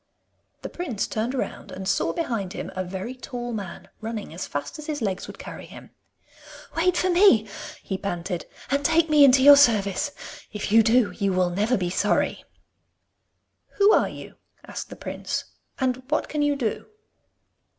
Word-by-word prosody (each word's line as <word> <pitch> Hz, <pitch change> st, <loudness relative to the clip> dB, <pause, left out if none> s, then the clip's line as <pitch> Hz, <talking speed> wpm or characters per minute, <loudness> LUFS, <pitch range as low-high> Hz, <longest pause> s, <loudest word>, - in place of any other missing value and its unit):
The -, -, -4 dB
prince 260 Hz, -, -3 dB
turned 230 Hz, +5 st, -2 dB
round 255 Hz, -, -4 dB
and 190 Hz, 0 st, -6 dB
saw -, -, +1 dB
behind 230 Hz, -, -3 dB
him -, -, -6 dB
a 185 Hz, -, -1 dB
very 190 Hz, +6 st, -5 dB
tall 245 Hz, -1 st, -6 dB
man, 200 Hz, -5 st, -6 dB
running 220 Hz, -5 st, -5 dB
as 170 Hz, -, -5 dB
fast 145 Hz, -, -5 dB
as 305 Hz, -, -8 dB
his 300 Hz, -2 st, -2 dB
legs 195 Hz, -4 st, -2 dB
would -, -, -10 dB
carry -, -, -9 dB
him. -, -, -13 dB, 0.8 s
'Wait 350 Hz, +2 st, +2 dB
for 370 Hz, +1 st, +2 dB
me,' 345 Hz, -, +5 dB, 0.4 s
he 190 Hz, -1 st, -4 dB
panted, 180 Hz, -2 st, -4 dB, 0.2 s
'and 280 Hz, 0 st, +1 dB
take 325 Hz, +1 st, +3 dB
me 300 Hz, -1 st, +7 dB
into 265 Hz, -1 st, +6 dB
your 285 Hz, 0 st, +10 dB
service. 225 Hz, -1 st, +3 dB, 0.4 s
If 210 Hz, -1 st, -4 dB
you 225 Hz, +1 st, +7 dB
do, 225 Hz, 0 st, +3 dB
you 200 Hz, -3 st, -1 dB
will 180 Hz, -1 st, +2 dB
never 210 Hz, +7 st, +1 dB
be 180 Hz, -2 st, -2 dB
sorry.' -, -, 0 dB, 1.3 s
'Who 410 Hz, +1 st, +5 dB
are -, -, +3 dB
you?' -, -, -11 dB, 0.3 s
asked -, -, -7 dB
the -, -, -8 dB
prince, -, -, -4 dB, 0.3 s
'and 260 Hz, -1 st, 0 dB
what 305 Hz, -, 0 dB
can 300 Hz, -, -2 dB
you 290 Hz, 0 st, +2 dB
do? 235 Hz, -6 st, -3 dB
230 Hz, 170 wpm, -25 LUFS, 195-290 Hz, 1.3 s, your